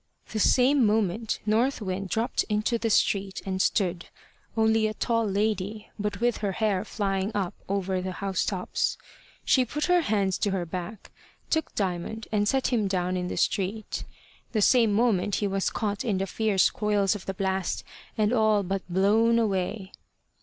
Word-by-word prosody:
The 220 Hz, -, -2 dB
same 260 Hz, +5 st, +4 dB
moment 215 Hz, 0 st, +1 dB
North 230 Hz, +6 st, +2 dB
Wind 190 Hz, -2 st, -4 dB
dropt 225 Hz, +5 st, 0 dB
into 215 Hz, +3 st, 0 dB
the 225 Hz, -, 0 dB
street 195 Hz, -2 st, +1 dB
and 190 Hz, -1 st, -1 dB
stood, 180 Hz, -4 st, 0 dB, 0.5 s
only 220 Hz, 0 st, +3 dB
a 215 Hz, -, -4 dB
tall 230 Hz, -2 st, 0 dB
lady, 205 Hz, +1 st, -2 dB
but 205 Hz, -1 st, -2 dB
with 240 Hz, 0 st, +1 dB
her 200 Hz, -2 st, -2 dB
hair 205 Hz, -2 st, 0 dB
flying 195 Hz, -2 st, -2 dB
up 195 Hz, -2 st, -1 dB, 0.2 s
over 190 Hz, -1 st, -1 dB
the 185 Hz, 0 st, -4 dB
housetops. 190 Hz, -1 st, -1 dB, 0.5 s
She 260 Hz, -, +4 dB
put 295 Hz, +5 st, -2 dB
her 360 Hz, -1 st, +4 dB
hands 200 Hz, -, 0 dB
to 205 Hz, -, +1 dB
her 190 Hz, -3 st, -1 dB
back, 180 Hz, +4 st, -7 dB, 0.4 s
took 320 Hz, -1 st, 0 dB
Diamond, 195 Hz, +3 st, -3 dB
and 205 Hz, -1 st, +1 dB
set 265 Hz, +1 st, +1 dB
him 215 Hz, -4 st, +2 dB
down 185 Hz, -1 st, -1 dB
in 180 Hz, 0 st, -2 dB
the -, -, -4 dB
street. 200 Hz, +2 st, -1 dB, 0.5 s
The 215 Hz, -, +1 dB
same 235 Hz, -2 st, +5 dB
moment 205 Hz, -3 st, +2 dB
he 205 Hz, -, 0 dB
was 195 Hz, 0 st, 0 dB
caught 205 Hz, -3 st, -2 dB
in 210 Hz, -5 st, 0 dB
the 195 Hz, -, -1 dB
fierce 205 Hz, -1 st, +2 dB
coils 210 Hz, -2 st, +1 dB
of 205 Hz, -3 st, -8 dB
the 195 Hz, -, -3 dB
blast, 190 Hz, -1 st, -1 dB, 0.3 s
and 215 Hz, +1 st, +2 dB
all 215 Hz, -3 st, +3 dB
but 195 Hz, +1 st, -2 dB
blown 215 Hz, +5 st, +3 dB
away. 195 Hz, -2 st, -1 dB
205 Hz, 170 wpm, -27 LUFS, 190-220 Hz, 0.5 s, same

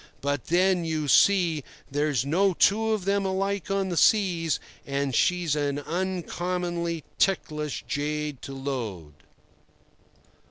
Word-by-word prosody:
But 140 Hz, -2 st, -2 dB
then, 180 Hz, +1 st, +2 dB
you 160 Hz, -2 st, -2 dB
see, 170 Hz, -1 st, +4 dB, 0.3 s
there's 145 Hz, -3 st, 0 dB
no 185 Hz, +6 st, +2 dB
two 220 Hz, +5 st, +3 dB
of 210 Hz, -4 st, -1 dB
them 200 Hz, 0 st, +1 dB
alike 195 Hz, -1 st, -1 dB
on 195 Hz, -1 st, 0 dB
the 175 Hz, -, -3 dB
seas, 175 Hz, -8 st, +3 dB, 0.2 s
and 140 Hz, -1 st, -2 dB
she's 175 Hz, +3 st, +2 dB
an 145 Hz, -1 st, -1 dB
uncommonly 175 Hz, 0 st, -2 dB, 0.2 s
ticklish 150 Hz, -6 st, 0 dB
jade 150 Hz, -1 st, -2 dB
to 135 Hz, -, -7 dB
load." 115 Hz, -, -5 dB
165 Hz, 120 wpm, -26 LUFS, 145-190 Hz, 0.3 s, see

